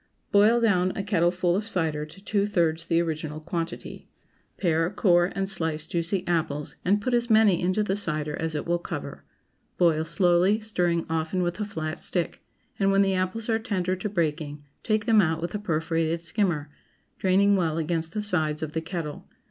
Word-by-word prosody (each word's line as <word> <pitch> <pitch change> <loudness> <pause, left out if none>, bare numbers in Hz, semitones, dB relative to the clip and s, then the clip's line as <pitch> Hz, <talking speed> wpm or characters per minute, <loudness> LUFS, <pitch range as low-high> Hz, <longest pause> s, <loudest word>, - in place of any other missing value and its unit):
Boil 215 +4 +5
down 185 -6 +3
a 195 - -2
kettleful 180 -2 +1
of 210 +3 -2
cider 160 -7 -1
to 160 +5 -14
two 205 -1 0
thirds 165 -4 0
the 165 - +2
original 155 -2 -3
quantity. 165 +1 -5 0.5
Pare, 165 -2 +1
core, 180 -3 +3
and 195 0 -1
slice 160 -5 -1
juicy 175 +2 -1
apples, 155 -4 -1
and 200 +3 +3
put 245 +4 -2
as 240 0 +1
many 215 -5 +5
into 185 +4 +1
the 195 -2 -1
cider 155 -6 -2
as 160 -1 -2
it 150 - -3
will 175 0 0
cover. - - -6 0.5
Boil 165 -3 +3
slowly, 175 +4 +3
stirring 175 -6 0
often 160 +3 -1
with 175 +2 -2
a 210 - -1
flat 155 -5 -4
stick, 175 -3 -2 0.4
and 195 -1 +3
when 195 0 +4
the 195 -1 +1
apples 185 +4 -1
are 225 -1 +1
tender 185 -5 -1
to 185 +3 -4
breaking, 150 -5 -2 0.2
take 215 -2 0
them 225 -3 +5
out 160 -3 0
with 170 - -4
a 210 - -2
perforated 165 -2 -1
skimmer, 165 -4 -1 0.5
draining 195 +2 +4
well 165 -4 0
against 165 0 -2
the 210 - -1
sides 160 -6 +1
of 155 - -4
the 160 - -1
kettle. 165 -3 -6
175 Hz, 185 wpm, -26 LUFS, 160-200 Hz, 0.5 s, Boil